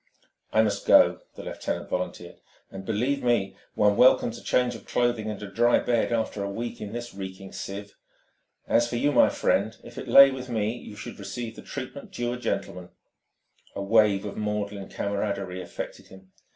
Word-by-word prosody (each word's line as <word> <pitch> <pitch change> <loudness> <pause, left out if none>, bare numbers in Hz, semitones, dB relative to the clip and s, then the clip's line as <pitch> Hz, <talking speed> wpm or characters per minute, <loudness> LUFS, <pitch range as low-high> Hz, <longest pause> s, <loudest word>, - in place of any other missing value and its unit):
"I 110 - +4
must 100 -2 -2
go," - - +6 0.2
the - - -8
lieutenant - - -4
volunteered. 90 -1 -4 0.3
"And 95 0 -8
believe 125 +6 0
me, 120 -6 +1 0.2
one 105 -1 +3
welcomes 120 -2 +5
a - - -16
change 125 -1 +2
of 115 - -11
clothing 120 -3 0
and 105 - -5
a - - -5
dry 120 +5 +3
bed 120 -1 +1
after 110 -3 -1
a 100 - -3
week 115 +4 -5
in 105 -1 -5
this 120 +1 -6
reeking 95 0 -8
sieve. 100 +1 -6 0.7
As 120 0 +3
for 120 - -3
you, 145 +5 +2
my - - +6
friend, - - 0
if - - -9
it - - -7
lay 140 0 +9
with 130 -1 -6
me, 110 -1 -1
you 110 -3 -10
should 105 - -8
receive 110 +4 -5
the - - -10
treatment 140 +1 -7
due 120 0 -2
a - - -4
gentleman." 90 -6 -3 0.9
A 100 - -3
wave 105 -1 +3
of 100 - -6
maudlin 105 -2 -3
camaraderie 100 -2 -3
affected 85 - -7
him. 95 0 -16
105 Hz, 185 wpm, -26 LUFS, 100-120 Hz, 0.9 s, lay